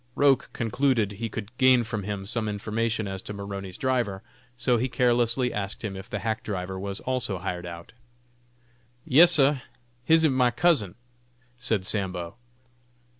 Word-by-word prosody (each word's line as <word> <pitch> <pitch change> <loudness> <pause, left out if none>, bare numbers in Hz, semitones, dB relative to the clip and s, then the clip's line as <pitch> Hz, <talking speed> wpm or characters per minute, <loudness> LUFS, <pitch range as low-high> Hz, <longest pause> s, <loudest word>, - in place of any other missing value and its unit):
Roch 140 -2 +3
concluded 115 -2 0
he 110 +3 -5
could 110 +2 -7
gain 130 -2 +5
from 110 -2 -4
him 100 0 -5
some 110 +1 -2
information 110 +1 -2
as 95 -1 -5
to - - -7
Maroney's 100 -2 -6
driver, 120 -7 -1 0.3
so 120 0 +2
he 125 +3 -1
carelessly 120 0 +2
asked 100 +1 -4
him 100 -3 -4
if 95 0 -9
the 105 - -3
hack 110 +1 -2
driver 95 -2 -4
was 100 0 -4
also 125 -6 0
hired 90 -1 -4
out. 85 0 -9 1.1
"Yes, 165 +4 +7
sah, 140 -2 +4 0.4
him 160 +4 +4
ib 155 - +4
my 130 -1 +3
cousin," 120 - +2 0.6
said 110 -6 -1
Sambo. 95 -3 -2
110 Hz, 155 wpm, -26 LUFS, 100-125 Hz, 1.1 s, Yes